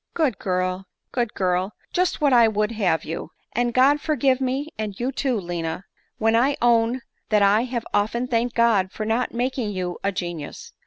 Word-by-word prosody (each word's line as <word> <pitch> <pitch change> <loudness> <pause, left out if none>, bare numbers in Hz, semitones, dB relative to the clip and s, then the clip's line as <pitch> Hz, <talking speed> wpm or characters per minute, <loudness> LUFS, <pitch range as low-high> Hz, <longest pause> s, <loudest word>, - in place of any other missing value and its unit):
" - - -56
Good 285 - +1
girl, 185 0 -1 0.2
good 240 -4 -1
girl! 185 +1 0 0.2
just 365 -1 +1
what 285 -3 +4
I 235 -2 +7
would 210 0 0
have 190 -8 0
you! 160 0 -5 0.2
And 240 +1 +1
God 275 +4 +4
forgive 270 -3 +1
me, 265 +4 -1
and 210 -3 -5
you 250 +2 -1
too, 260 -4 -1
lina, 175 0 -4 0.3
when 225 0 +2
I 265 +5 +3
own 235 +1 +3 0.3
ffaat 210 -2 +4
I 210 +4 +4
have 240 -2 -3
often 220 +4 +1
thanked 240 -1 0
God 220 -6 +3
for 215 - -4
not 225 +3 0
making 245 -1 -1
you 180 -2 -3
a 200 - +1
ge 185 - -3
nius 150 -3 -8
230 Hz, 195 wpm, -23 LUFS, 195-255 Hz, 0.3 s, I